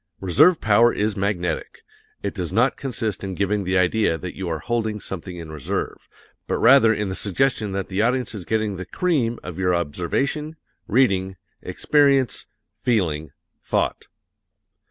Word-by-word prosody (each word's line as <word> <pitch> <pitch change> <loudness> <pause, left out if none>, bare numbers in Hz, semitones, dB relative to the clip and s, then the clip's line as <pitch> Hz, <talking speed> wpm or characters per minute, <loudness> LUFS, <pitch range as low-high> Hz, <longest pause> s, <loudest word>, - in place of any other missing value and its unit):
Reserve 150 - +4
power 110 +2 +4
is 105 0 -1
magnetic. 95 -4 -2 0.4
It 100 - -2
does 90 -4 -4
not 115 +7 +2
consist 115 -7 -3
in 95 -1 -4
giving 100 +1 0
the 95 +1 +1
idea 90 -1 +2
that 90 +1 -7
you 95 -2 -4
are 80 - -1
holding 110 +3 -2
something 90 -2 -7
in 80 -2 -8
reserve, 75 -3 -4 0.4
but - - 0
rather 130 -4 +6
in 105 -2 -1
the - - -3
suggestion 105 +2 0
that 95 -1 -3
the 95 +1 -1
audience 125 0 0
is 100 -4 -6
getting 110 -1 -1
the 95 - -6
cream 135 - 0
of 90 0 -7
your 90 -1 +2
observation, 115 - -2 0.3
reading, 95 -6 +2 0.2
experience, 140 -4 +2 0.3
feeling, 80 - 0 0.3
thought. - - -1
100 Hz, 155 wpm, -23 LUFS, 90-120 Hz, 0.4 s, rather